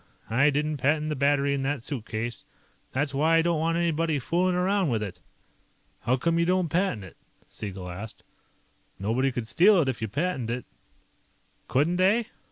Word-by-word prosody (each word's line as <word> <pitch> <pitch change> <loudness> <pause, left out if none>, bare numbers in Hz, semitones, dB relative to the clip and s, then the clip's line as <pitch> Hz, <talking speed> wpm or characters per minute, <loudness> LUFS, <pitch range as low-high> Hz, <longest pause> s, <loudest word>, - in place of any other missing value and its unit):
I 135 +6 +4
didn't 150 +1 -1
patent 150 +3 +1
the 150 - -1
battery 140 0 +2
in 140 - -1
that 135 -2 -2
suitcase. 115 -4 -4 0.5
That's 140 +2 -1
why 160 +4 +3
I - - +5
don't 170 -2 +1
want 165 +1 +1
anybody 165 -2 +1
fooling 180 +7 +1
around 185 -1 +1
with 110 -3 0
it." 100 -4 -7 0.8
"How 125 - +1
come 170 +5 +1
you 170 - +3
don't 180 -2 +2
patent 165 - 0
it?" 95 - -13 0.3
Siegel 95 -3 -7
asked. 95 +5 -8 0.7
"Nobody 120 +7 0
could 120 -3 -4
steal 190 - +5
it 150 - +2
if 130 -4 -2
you 110 - -1
patented 125 - -2
it." 125 - -11 1.0
"Couldn't 155 +7 +1
they?" 205 +6 +3
145 Hz, 175 wpm, -27 LUFS, 120-170 Hz, 1.0 s, I